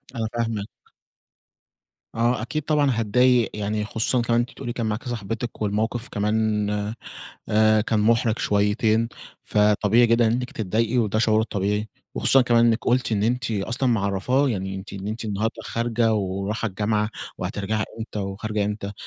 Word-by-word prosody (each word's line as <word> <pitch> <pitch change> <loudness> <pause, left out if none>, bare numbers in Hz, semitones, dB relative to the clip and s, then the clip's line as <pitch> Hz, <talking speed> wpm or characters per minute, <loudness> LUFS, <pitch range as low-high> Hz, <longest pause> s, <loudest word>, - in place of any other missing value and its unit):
أنا 110 -1 -1
فاهمِك. 115 -3 -2 1.5
آه 120 0 +1
أكيد 155 +6 -3
طبعًا 145 -3 +2
هاتضايق، 120 +2 +3
يعني 105 0 -2
خصوصًا 115 +3 0
كمان 120 0 +2
أنتِ 120 - -2
بتقولي 120 -3 -6
كان 115 -3 -2
معاكِ 105 +1 -2
صحبتِك 115 0 -4
والموقِف 110 +4 -1
كمان 105 0 0 0.8
آآ 110 0 +4
كان 105 0 0
مُحرِج 115 +1 +2
شويّتين، 110 +2 +2 0.3
فطبيعي 105 +3 +3
جدًا 115 0 +3
إنّك 125 +2 0
تتضايقي، 115 +3 0
وده 110 -2 +1
شعور 110 -1 +3
طبيعي، 105 0 -1 0.3
وخصوصًا 135 -1 +4
كمان 120 -1 +4
إنِّك 115 0 +3
قلتِ 125 -2 +1
إن 100 -1 +1
أنتِ 125 +1 0
أصلًا 115 +6 0
معرّفاه، 115 +6 +1
يعني 95 -4 -3
أنتِ 95 +1 -8
إن 100 0 -6
أنتِ 110 +1 -4
النهارده 110 +2 -1
خارجة 115 -1 0
وراحه 100 +3 -2
الجامعة 105 +2 0 0.3
وهترجَعي 105 +2 -2
إمتى 110 -1 -5
وخارجة 100 +2 -2
إمتى، 100 -1 -4
110 Hz, 150 wpm, -24 LUFS, 105-120 Hz, 1.5 s, آآ